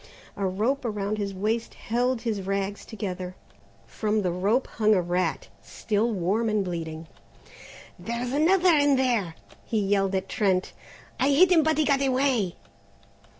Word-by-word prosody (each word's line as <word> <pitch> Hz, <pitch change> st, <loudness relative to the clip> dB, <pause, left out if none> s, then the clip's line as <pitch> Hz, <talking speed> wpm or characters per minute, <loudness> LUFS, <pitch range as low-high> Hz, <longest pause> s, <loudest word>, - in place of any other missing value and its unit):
A 200 Hz, -1 st, -1 dB
rope 225 Hz, +10 st, -1 dB
around 210 Hz, -2 st, -2 dB
his 200 Hz, -1 st, -2 dB
waist 215 Hz, +4 st, -2 dB
held 245 Hz, +1 st, -1 dB
his 220 Hz, -4 st, -2 dB
rags 195 Hz, +1 st, -3 dB
together. 185 Hz, -4 st, -5 dB, 0.5 s
From 215 Hz, -1 st, -1 dB
the 180 Hz, -, 0 dB
rope 200 Hz, +9 st, +1 dB
hung 215 Hz, -1 st, +2 dB
a 185 Hz, -, +2 dB
rat, 175 Hz, -3 st, -1 dB
still 215 Hz, -, -1 dB
warm 210 Hz, +4 st, 0 dB
and 210 Hz, -2 st, 0 dB
bleeding. 165 Hz, -2 st, -5 dB, 0.9 s
"There's 235 Hz, +7 st, -4 dB
another 355 Hz, +4 st, +4 dB
in 290 Hz, -2 st, +4 dB
there," 235 Hz, -10 st, 0 dB, 0.3 s
he 225 Hz, -, -2 dB
yelled 195 Hz, -1 st, +1 dB
at 190 Hz, -, -2 dB
Trent; 190 Hz, -5 st, 0 dB, 0.5 s
"I 270 Hz, -, +3 dB
hit 345 Hz, +7 st, +5 dB
him 335 Hz, -3 st, +6 dB
but 315 Hz, 0 st, +1 dB
he 310 Hz, -, +2 dB
got 280 Hz, -1 st, +2 dB
away." 260 Hz, -8 st, +1 dB
215 Hz, 150 wpm, -26 LUFS, 190-255 Hz, 0.9 s, him